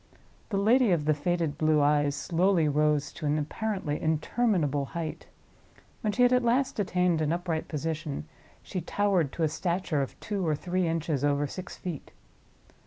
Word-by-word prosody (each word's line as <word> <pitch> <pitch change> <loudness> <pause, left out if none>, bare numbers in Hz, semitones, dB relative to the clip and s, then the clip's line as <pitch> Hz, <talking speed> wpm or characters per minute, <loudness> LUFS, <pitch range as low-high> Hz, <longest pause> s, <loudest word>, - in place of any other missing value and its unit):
The 200 - -1
lady 230 +4 +4
of 165 -5 +2
the 155 - +4
faded 160 0 -1
blue 155 -1 +3
eyes 145 0 +3
slowly 170 +3 +2
rose 150 0 +1
to 155 - -4
an 145 +1 +2
apparently 155 0 -2
interminable 160 - +1
height. 160 -2 -5 0.7
When 215 - 0
she 250 +4 +2
had 245 0 +5
at 250 - +4
last 245 +1 +1
attained 180 -4 +1
an 155 0 +1
upright 170 -2 -2
position, 155 - -3 0.4
she 185 - -4
towered 185 -4 +1
to 165 - -2
a - - +4
stature 170 -1 -1
of 135 - -5
two 205 -3 -3
or 155 - +2
three 180 +4 -1
inches 160 -4 -1
over 145 0 +2
six 180 +5 -7
feet. 170 -6 -6
165 Hz, 170 wpm, -28 LUFS, 150-185 Hz, 0.7 s, had